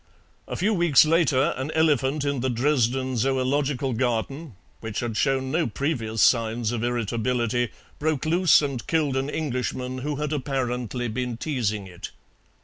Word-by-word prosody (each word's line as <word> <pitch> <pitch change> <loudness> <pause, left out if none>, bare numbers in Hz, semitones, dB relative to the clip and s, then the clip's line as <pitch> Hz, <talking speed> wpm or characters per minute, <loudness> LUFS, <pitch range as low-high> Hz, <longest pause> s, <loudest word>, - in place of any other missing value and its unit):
A - - -4
few 210 +4 +1
weeks 170 -7 +5
later 155 -2 +3
an 135 +3 -3
elephant 150 -2 +2
in 140 -2 0
the 130 +2 0
Dresden 130 0 +1
Zoological 135 +2 0
Garden, 125 - -2 0.2
which 110 -2 -4
had 120 -2 -3
shown 130 +1 +1
no 165 +2 +1
previous 115 -3 -1
signs 115 -1 +2
of 120 -2 -2
irritability, 120 0 0 0.3
broke 155 -2 -1
loose 170 0 +4
and 135 -4 -4
killed 155 -5 +1
an 135 +1 -1
Englishman 130 -3 -3
who 145 +3 -3
had 150 +1 -2
apparently 125 -4 -2
been 125 +1 -3
teasing 110 -9 -2
it. 90 -2 -8
130 Hz, 145 wpm, -25 LUFS, 120-145 Hz, 0.3 s, weeks